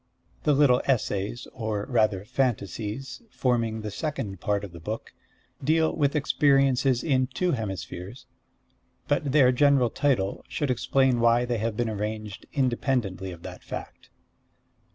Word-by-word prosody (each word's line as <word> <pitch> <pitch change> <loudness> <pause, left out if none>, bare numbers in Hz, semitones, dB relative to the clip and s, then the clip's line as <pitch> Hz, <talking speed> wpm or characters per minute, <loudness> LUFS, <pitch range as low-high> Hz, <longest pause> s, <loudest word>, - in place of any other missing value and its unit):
The 150 - +4
little 135 -3 +5
essays, 115 -3 -1
or 110 -4 -3
rather 110 -5 +1
fantasies, 115 - -2
forming 115 - 0
the 105 -1 -5
second 105 - -4
part 105 -1 0
of 100 - -7
the 85 - -10
book, 105 +7 -6 0.5
deal 160 +3 +2
with 145 -1 +1
experiences 135 -3 +3
in 130 -4 +2
two 175 +8 -1
hemispheres; 100 - -5 0.8
but 145 -1 +1
their 135 -3 +6
general 130 -2 +4
title 125 -10 0
should 145 -3 -1
explain 125 +1 +2
why 120 +1 +4
they 120 -2 -1
have 110 0 -2
been 120 - 0
arranged 105 -1 -4
independently 120 -8 0
of 85 -1 -11
that - - -8
fact. - - -8
120 Hz, 135 wpm, -26 LUFS, 105-135 Hz, 0.8 s, their